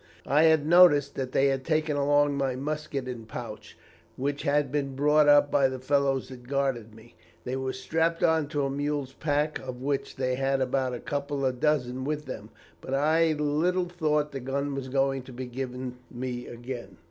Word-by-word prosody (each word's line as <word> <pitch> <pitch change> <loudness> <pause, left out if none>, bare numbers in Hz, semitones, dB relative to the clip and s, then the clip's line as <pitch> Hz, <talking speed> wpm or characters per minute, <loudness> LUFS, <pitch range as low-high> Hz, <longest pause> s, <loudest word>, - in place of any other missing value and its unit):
"I 150 +4 +4
had 160 -2 +4
noticed 160 -4 +6
that 130 -1 -4
they 135 - +3
had 135 -1 -1
taken 155 0 0
along 145 0 +3
my 135 -2 0
musket 145 -1 -3
and 120 -3 -6
pouch, 110 -2 -8 0.4
which 140 +2 -2
had 145 -1 +1
been 140 -2 -2
brought 150 +2 +4
up 145 0 +6
by 135 - +4
the 130 0 -4
fellows 135 0 0
that 125 -2 -11
guarded 130 -5 -1
me. 115 +1 -16 0.3
They 125 - -3
were 130 0 -2
strapped 165 +5 -1
on 160 -2 +3
to 145 -1 -1
a - - -1
mule's 145 -1 -2
pack, 150 +1 -1
of 130 -2 -7
which 140 0 -2
they 130 -1 -1
had 135 +1 0
about 130 -1 0
a - - -6
couple 140 -1 -3
of 130 -1 -1
dozen 130 -4 0
with 150 +2 -3
them, 110 -5 -7 0.3
but 135 - -3
I 160 +3 +3
little 160 +5 0
thought 150 -4 0
the 135 - -5
gun 140 +2 -2
was 135 -1 -4
going 135 0 +1
to 130 - -12
be 130 +1 -5
given 125 0 -5
me 125 0 -5
again. 120 -4 -8
135 Hz, 195 wpm, -27 LUFS, 130-150 Hz, 0.4 s, noticed